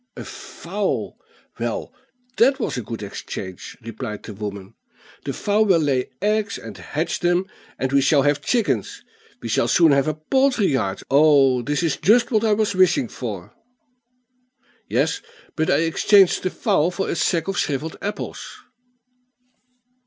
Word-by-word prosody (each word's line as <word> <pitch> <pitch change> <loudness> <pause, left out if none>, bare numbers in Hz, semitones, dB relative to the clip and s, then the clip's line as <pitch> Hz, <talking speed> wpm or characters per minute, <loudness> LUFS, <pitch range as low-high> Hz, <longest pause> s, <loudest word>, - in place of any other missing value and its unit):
"A - - -6
fowl! - - -4 0.4
Well, - - -3 0.4
that 265 +4 +4
was - - -2
a 125 - -2
good 115 -1 -7
exchange," 95 -2 -7
replied 110 -1 -6
the 110 - -8
woman. 100 -1 -7 0.5
"The - - -2
fowl 210 +1 +1
will 190 -4 +4
lay 135 -5 0
eggs 210 -1 0
and 110 -3 -9
hatch 145 - -3
them, 175 +1 +1 0.3
and 130 +1 -2
we 140 - +5
shall 140 +1 +3
have 145 0 +1
chickens; 200 - -1 0.4
we - - -3
shall 115 +1 +1
soon 160 +6 +5
have 140 0 +3
a 155 - -1
poultry 255 - +1
yard. 100 -8 -1
Oh, 140 -3 +5
this 145 +7 -1
is 160 -4 0
just 230 +5 +3
what 220 -2 +2
I 220 -2 +3
was 210 -1 +1
wishing 185 - +3
for." 100 -8 -7 1.4
"Yes, - - 0 0.3
but 160 0 0
I - - +3
exchanged 190 +3 +4
the 185 - -1
fowl 165 -2 +1
for 190 +2 -3
a - - -2
sack 165 0 0
of 195 +1 -1
shrivelled 150 +3 -2
apples." 205 - -6
155 Hz, 155 wpm, -22 LUFS, 125-195 Hz, 1.4 s, we